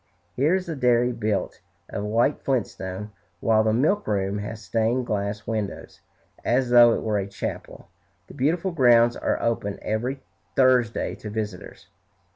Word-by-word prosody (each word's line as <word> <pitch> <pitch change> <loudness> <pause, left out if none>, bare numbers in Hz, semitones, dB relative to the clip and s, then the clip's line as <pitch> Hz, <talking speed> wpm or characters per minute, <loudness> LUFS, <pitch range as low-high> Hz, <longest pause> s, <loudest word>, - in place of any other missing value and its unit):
Here 150 +8 +3
is 190 -1 -2
the 165 -3 -4
dairy 125 -2 +3
built 110 -4 -2 0.3
of 100 - -5
white 115 +7 +1
flintstone, 105 -5 -3 0.3
while 110 +3 +3
the 110 - +2
milkroom 110 - 0
has 105 +2 -6
stained 115 +3 0
glass 105 -1 -3
windows, 110 -3 -5 0.4
as 125 0 +1
though 120 -1 +8
it - - -2
were 105 -2 0
a 95 - -3
chapel. 100 - -6 0.4
The - - -14
beautiful 165 +7 0
grounds 120 -6 +5
are - - -1
open 110 -4 -1
every 125 +5 -2 0.3
Thursday 125 -3 +2
to 105 - -8
visitors. 105 -3 -6
115 Hz, 145 wpm, -24 LUFS, 105-130 Hz, 0.4 s, though